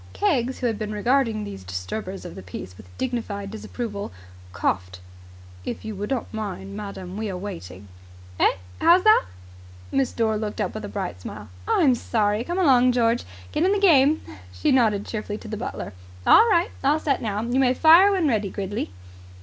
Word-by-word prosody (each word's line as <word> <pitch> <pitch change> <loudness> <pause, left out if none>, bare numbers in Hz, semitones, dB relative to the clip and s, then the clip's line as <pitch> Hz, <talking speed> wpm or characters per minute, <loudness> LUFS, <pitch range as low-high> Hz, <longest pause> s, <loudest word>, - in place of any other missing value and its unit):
Keggs, 265 - +1
who 255 - -4
had 225 -3 0
been 215 -1 -3
regarding 225 0 +1
these 95 - -7
disturbers 95 - -5
of 175 - -7
the - - -9
peace 90 0 -8
with 90 - -15
dignified 220 -6 -3
disapproval, 220 -1 -5 0.4
coughed. 90 -1 -2 0.6
"If - - -5
you 220 - -4
would 205 +1 -5
not 260 -4 -3
mind, 200 -2 -5
madam. 200 -2 -7
We 215 -1 -2
are 185 - -4
waiting." 100 - -8 0.5
"Eh? - - +5 0.3
How's 360 +2 +5
that?" 435 0 +6 0.7
Miss 270 -2 +1
Dore 220 -2 0
looked 210 -1 -4
up - - -1
with 215 - -6
a - - -6
bright 185 - -4
smile. 105 +2 -8 0.2
"I'm 280 -7 +4
sorry. 215 -2 0
Come 345 +7 -3
along, 255 -8 +5
George. 235 -1 +2 0.3
Get - - -1
in 380 +2 +4
the - - +2
game." 310 -5 +5 0.3
She 90 0 0
nodded 220 -6 +3
cheerfully 210 -1 -4
to 220 - -11
the 215 - -4
butler. 210 - -5 0.3
"All 460 - +7
right. 345 -4 +3
All 285 +3 +4
set 285 -3 0
now. 210 -3 -2
You 240 +3 0
may 255 -1 +3
fire 335 +7 +7
when 370 -5 +2
ready, 215 -6 +1
Gridley." 200 - -4
220 Hz, 185 wpm, -24 LUFS, 200-260 Hz, 0.7 s, All